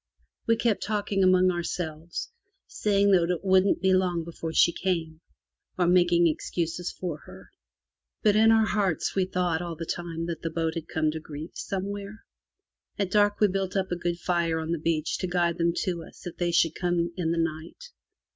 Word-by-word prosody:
We 230 - +4
kept 230 -2 0
talking 205 -2 0
among 185 0 +5
ourselves, 170 - -4 0.3
saying 200 -1 +1
that 175 -3 +4
it 180 +1 -2
wouldn't 190 0 +3
be 190 0 +4
long 180 -2 +1
before 165 -1 -6
she 170 - +5
came, 165 -4 -2 0.6
or 180 - +2
making 175 -1 +4
excuses 170 +2 -2
for 175 -5 -5
her. 95 +1 -13 0.7
But 210 -1 +4
in 220 +1 +6
our 220 -1 +5
hearts 200 -6 0
we 190 -1 +1
thought 180 -3 -1
all 170 -1 -5
the 165 +1 -6
time 165 -1 -4
that 170 -2 -5
the 165 - -2
boat 165 0 -1
had 165 -1 -5
come 155 -1 0
to 160 - -5
grief 155 +1 -8
somewhere. 200 +2 -5 0.7
At 195 -2 -1
dark 205 -1 +3
we 210 - +5
built 195 0 -2
up 190 -1 -1
a - - +1
good 175 0 -2
fire 170 -2 0
on 160 +1 -4
the 170 - -1
beach 160 -1 -1
to 185 - -2
guide 175 -1 0
them 170 0 +3
to 175 -2 -2
us - - -16
if 175 - -6
they 175 -1 0
should 165 -1 +3
come 175 -1 -1
in 165 -3 -1
the 170 - -1
night. 165 - -4
175 Hz, 195 wpm, -27 LUFS, 165-190 Hz, 0.7 s, in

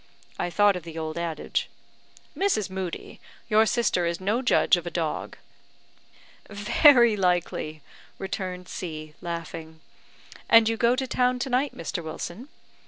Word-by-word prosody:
(I - - -1
thought 205 +3 +4
of 180 - -4
the 165 0 -9
old 160 -1 -4
adage.) 170 -3 -2 0.7
"Mrs. 370 - 0
Moodie, 185 -2 -6 0.3
your 220 0 +4
sister 195 -8 +1
is 170 0 -2
no 210 +6 0
judge 255 -6 +4
of 175 -1 -5
a - - -1
dog." 165 -2 -3 1.1
"Very 235 +3 +5
likely," 175 -5 -1 0.3
returned 185 -1 -5
C, 155 -5 -6
laughing. 165 -1 -6 0.7
"And 230 -1 +7
you 225 - +1
go 235 +2 +3
to 265 0 -1
town 250 0 +1
to 255 +1 -3
night, 260 +3 0
Mr. 165 +1 -4
Wilson? 175 - -7
185 Hz, 140 wpm, -26 LUFS, 170-230 Hz, 1.1 s, And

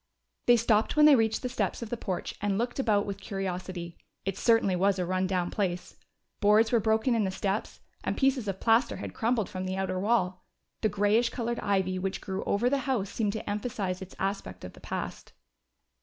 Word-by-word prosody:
They 240 0 +7
stopped 220 0 +2
when 300 0 +7
they 300 -2 +8
reached 225 -1 +1
the - - 0
steps 245 - -2
of 220 - -8
the - - 0
porch 190 -5 -4
and 200 -1 0
looked 240 +4 -2
about 210 -6 +2
with 200 -1 -5
curiosity. 185 -3 -5 0.3
It 195 -1 -1
certainly 225 -5 +3
was 195 +2 +2
a 180 - -1
run 185 +1 0
down 180 -2 -1
place. 180 -4 -2 0.4
Boards 215 +2 +4
were 235 - +4
broken 220 +3 +2
in 225 -2 +2
the 190 - 0
steps, 195 +2 -3 0.2
and - - -2
pieces 265 -5 +2
of 190 -1 -3
plaster 230 +2 +3
had - - -6
crumbled 230 -2 0
from 185 0 -5
the 190 0 -2
outer 190 -1 -1
wall. 185 -3 +1 0.4
The 215 - +2
grayish 210 +4 +2
colored 235 -1 -3
ivy 190 -2 0
which 190 +1 -2
grew 190 -1 -4
over 210 +5 +1
the 275 +2 +2
house 205 -7 0
seemed 210 -3 -1
to 220 - -6
emphasize 205 -3 -2
its 190 - -9
aspect 195 - -3
of 90 - -9
the - - -16
past. - - -5
205 Hz, 205 wpm, -29 LUFS, 190-230 Hz, 0.4 s, they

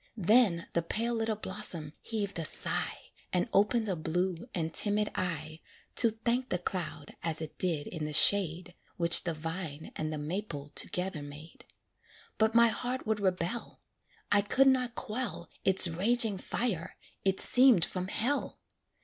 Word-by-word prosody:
Then 205 -3 +3
the 170 - +1
pale 230 +8 0
little 225 -1 -1
blossom 185 -7 -3
heaved 205 -5 -4
a - - -1
sigh, - - -1 0.2
And 180 +5 0
opened 215 +3 +2
a 190 - -1
blue 175 +6 -3
and 165 -5 -3
timid 210 0 +1
eye 155 -4 -4 0.4
To 230 - +7
thank 235 +3 -2
the 180 - 0
cloud 175 -4 -5
as 165 -1 -2
it 160 -2 -8
did 165 -5 0
in 160 -3 -6
the 150 - -4
shade, 180 -1 +3 0.2
Which 170 +1 +6
the 170 -2 -2
vine 160 -1 -6
and 155 0 -3
the 155 - -4
maple 150 -2 -5
together 180 +1 -3
made; 145 +3 -12 0.7
But 220 +1 +2
my 235 0 +6
heart 250 +3 -3
would 215 -1 -1
rebel; 185 +3 -2 0.5
I 205 0 +5
could 255 +7 +3
not 250 -2 +1
quell 235 -6 -5
Its 190 -1 +8
raging 205 +4 +1
fire 185 -6 -3 0.3
it 190 -1 0
seemed 250 -9 +5
from 185 0 -5
hell. 250 +8 -1
185 Hz, 155 wpm, -30 LUFS, 165-220 Hz, 0.7 s, Its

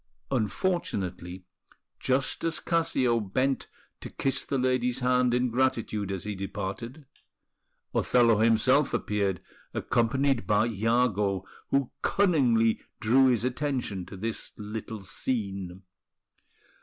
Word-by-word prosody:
Unfortunately, 100 - -2 0.6
just 130 +1 0
as 165 -1 0
Cassio 135 -8 +1
bent 130 +7 -1 0.3
to - - -8
kiss 135 - -1
the 135 - -2
lady's 125 0 +1
hand 125 0 +3
in 125 0 +1
gratitude 115 -5 0
as 95 -2 -4
he 105 - -3
departed, 100 +8 -5 0.9
Othello 115 -3 +4
himself 120 +6 +3
appeared, 100 -4 -1 0.3
accompanied 130 +2 +1
by 105 0 +3
Iago, 105 -3 +1 0.2
who 135 -2 +1
cunningly 125 - +3 0.2
drew 125 +4 +4
his 120 -3 +2
attention 125 -8 -2
to 100 - -9
this 110 +3 -4
little 105 0 -6
scene. 95 -3 -4
115 Hz, 105 wpm, -28 LUFS, 105-130 Hz, 0.9 s, Othello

